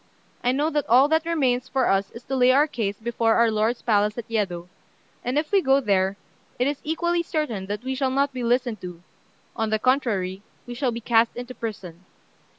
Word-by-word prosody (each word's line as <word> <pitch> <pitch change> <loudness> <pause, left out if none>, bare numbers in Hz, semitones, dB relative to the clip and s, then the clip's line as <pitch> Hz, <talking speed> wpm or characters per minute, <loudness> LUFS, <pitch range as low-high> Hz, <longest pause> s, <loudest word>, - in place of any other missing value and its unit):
I 245 - +3
know 295 +5 0
that 295 -3 -1
all 255 +4 +6
that 320 +1 +1
remains 255 -6 +1
for 265 -2 +1
us 195 0 +1
is 230 - -12
to 270 - -3
lay 250 -1 +5
our 280 +3 +5
case 215 -9 -3
before 230 0 +1
our 235 -1 +4
lord's 220 +3 0
palace 210 -1 +2
at 235 - -6
Yedo; 190 -7 -2 0.6
and 250 +3 -1
if 300 0 -1
we 400 -1 +4
go 270 -2 +4
there, 195 -5 +1 0.4
it 250 - +1
is 285 +1 -2
equally 345 +2 0
certain 300 - -3
that 205 +3 -4
we 260 +1 -2
shall 265 0 0
not 275 +1 0
be 255 - -4
listened 240 -3 0
to 180 -1 -9 0.5
on 225 -2 -1
the 215 - +1
contrary, 210 -7 0 0.2
we 245 - -7
shall 250 +1 -1
be 235 0 -5
cast 230 0 +2
into 245 +1 -7
prison. 190 -7 -7
240 Hz, 210 wpm, -24 LUFS, 215-270 Hz, 0.6 s, all